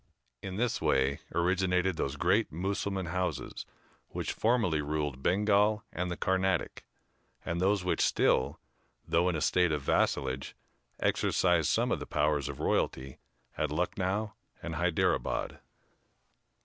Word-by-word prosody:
In 95 Hz, -1 st, -6 dB
this 120 Hz, +3 st, 0 dB
way 65 Hz, +1 st, +2 dB, 0.2 s
originated 90 Hz, +1 st, +1 dB
those 70 Hz, -2 st, -2 dB
great 95 Hz, +9 st, +2 dB
Mussulman 95 Hz, +3 st, -2 dB
houses 90 Hz, +1 st, -3 dB, 0.4 s
which -, -, -4 dB
formerly 110 Hz, -10 st, +1 dB
ruled 75 Hz, -3 st, -2 dB
Bengal 105 Hz, +4 st, +2 dB
and 90 Hz, 0 st, -2 dB
the 90 Hz, -, -4 dB
Carnatic, 95 Hz, -1 st, 0 dB, 0.6 s
and 85 Hz, +1 st, -2 dB
those 100 Hz, 0 st, +2 dB
which 90 Hz, -, 0 dB
still, 65 Hz, -, +2 dB, 0.5 s
though 85 Hz, +2 st, +2 dB
in 90 Hz, -, -1 dB
a 80 Hz, -, -2 dB
state 90 Hz, +2 st, +3 dB
of 75 Hz, -2 st, -1 dB
vassalage, 65 Hz, 0 st, 0 dB, 0.4 s
exercise 85 Hz, -4 st, +2 dB
some -, -, +1 dB
of -, -, 0 dB
the -, -, -7 dB
powers 75 Hz, -2 st, +1 dB
of 70 Hz, -, -7 dB
royalty 65 Hz, 0 st, -1 dB, 0.4 s
at -, -, -1 dB
Lucknow 100 Hz, +3 st, -1 dB, 0.3 s
and 85 Hz, -, -4 dB
Hyderabad. 85 Hz, +1 st, 0 dB
90 Hz, 130 wpm, -30 LUFS, 75-95 Hz, 0.6 s, state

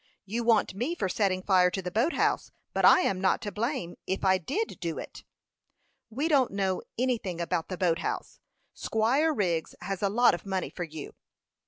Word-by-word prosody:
"You 225 Hz, +5 st, -2 dB
want 225 Hz, -4 st, +3 dB
me 245 Hz, -, -2 dB
for 195 Hz, -, -1 dB
setting 185 Hz, -1 st, 0 dB
fire 185 Hz, -2 st, +4 dB
to 190 Hz, -, -3 dB
the 180 Hz, -1 st, -4 dB
boat 240 Hz, -, +1 dB
house; -, -, 0 dB, 0.2 s
but -, -, 0 dB
I -, -, +8 dB
am 190 Hz, -, 0 dB
not 190 Hz, -, +2 dB
to 205 Hz, -, -3 dB
blame, 220 Hz, -, -3 dB
if 190 Hz, +1 st, -2 dB
I 190 Hz, 0 st, +4 dB
did 385 Hz, -, -3 dB
do 170 Hz, -3 st, -3 dB
it." -, -, -8 dB, 0.9 s
"We 270 Hz, +8 st, -1 dB
don't 280 Hz, -6 st, +3 dB
know 190 Hz, -2 st, -1 dB, 0.2 s
anything 230 Hz, -8 st, -1 dB
about 170 Hz, -1 st, -1 dB
the 185 Hz, -, -4 dB
boat 175 Hz, -1 st, +1 dB
house; -, -, -4 dB, 0.3 s
Squire 255 Hz, +9 st, +1 dB
Wriggs 175 Hz, -, -1 dB
has 190 Hz, +1 st, -4 dB
a 200 Hz, -, +2 dB
lot 240 Hz, +4 st, +4 dB
of 175 Hz, -, -4 dB
money 190 Hz, -2 st, -3 dB
for 175 Hz, -, -5 dB
you." 155 Hz, -2 st, -8 dB
195 Hz, 195 wpm, -28 LUFS, 180-235 Hz, 0.9 s, I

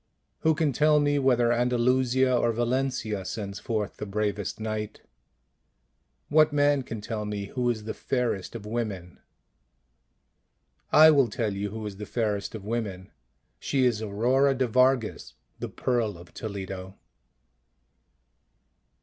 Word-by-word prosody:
Who 160 Hz, -1 st, +2 dB
can 150 Hz, -3 st, +1 dB
tell 150 Hz, +3 st, +4 dB
me 145 Hz, 0 st, +2 dB
whether 125 Hz, -3 st, +3 dB
Andalusia 125 Hz, +1 st, +2 dB
or 120 Hz, -1 st, +2 dB
Valencia 120 Hz, -3 st, -1 dB
sends 100 Hz, 0 st, -5 dB
forth 110 Hz, -3 st, -3 dB
the 105 Hz, -, -5 dB
bravest 105 Hz, 0 st, -2 dB
knight? 110 Hz, -1 st, -4 dB, 1.3 s
What 155 Hz, 0 st, +4 dB
man 145 Hz, -1 st, +3 dB
can 115 Hz, -4 st, -7 dB
tell 105 Hz, 0 st, -4 dB
me 105 Hz, -1 st, -4 dB
who 125 Hz, -1 st, 0 dB
is 110 Hz, -3 st, -2 dB
the 110 Hz, -, -4 dB
fairest 120 Hz, -6 st, -2 dB
of 110 Hz, -3 st, -7 dB
women? 105 Hz, -6 st, -4 dB, 1.7 s
I 155 Hz, +1 st, +8 dB
will 140 Hz, -4 st, +4 dB
tell 110 Hz, -2 st, -2 dB
you 100 Hz, +1 st, -3 dB
who 110 Hz, +1 st, -6 dB
is 100 Hz, -2 st, -6 dB
the 105 Hz, 0 st, -7 dB
fairest 105 Hz, -3 st, -2 dB
of 105 Hz, -3 st, -8 dB
women. 105 Hz, -5 st, -4 dB, 0.5 s
She 135 Hz, -2 st, +1 dB
is 115 Hz, -3 st, +1 dB
Aurora 125 Hz, +7 st, +2 dB
de 130 Hz, 0 st, +1 dB
Vargas, 125 Hz, -1 st, +1 dB, 0.2 s
the -, -, -4 dB
Pearl 115 Hz, -6 st, -1 dB
of 85 Hz, +1 st, -15 dB
Toledo. 95 Hz, -2 st, -6 dB
115 Hz, 135 wpm, -27 LUFS, 105-130 Hz, 1.7 s, I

